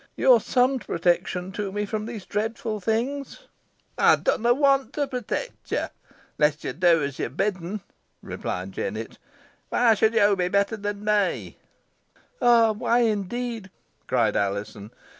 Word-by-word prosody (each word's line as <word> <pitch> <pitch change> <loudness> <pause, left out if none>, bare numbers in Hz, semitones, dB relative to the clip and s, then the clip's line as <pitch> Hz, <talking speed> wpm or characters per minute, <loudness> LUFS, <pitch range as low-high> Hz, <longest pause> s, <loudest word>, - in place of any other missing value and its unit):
You 260 - +5
are 235 - +6
some 255 +4 +2
protection 180 -1 -1
to 200 0 -4
me 205 +1 -2
from 215 +1 -4
these 225 -5 -7
dreadful 215 0 -3
beings." 260 - -2 0.6
"Ey - - +6
dunna 235 +2 +1
want 275 +1 +2
to 290 - 0
protect 265 - -5
yo - - -1 0.5
onless 150 0 +2
yo - - -2
do 170 -3 +3
os 140 -1 -6
yo're - - -1
bidd'n," 190 +4 -2 0.4
replied 90 +1 -5
Jennet! 110 +3 -5 0.5
"Whoy 240 -2 +4
should 220 +2 +2
yo 205 -2 +5
be 180 -2 0
better 200 +4 +1
than 205 0 -5
me?" 210 -3 0 0.8
"Ah! 235 -2 +5
why, 235 +3 +1
indeed?" 225 0 -2 0.4
cried - - +1
Alizon. 100 +1 -2
210 Hz, 140 wpm, -25 LUFS, 180-235 Hz, 0.8 s, are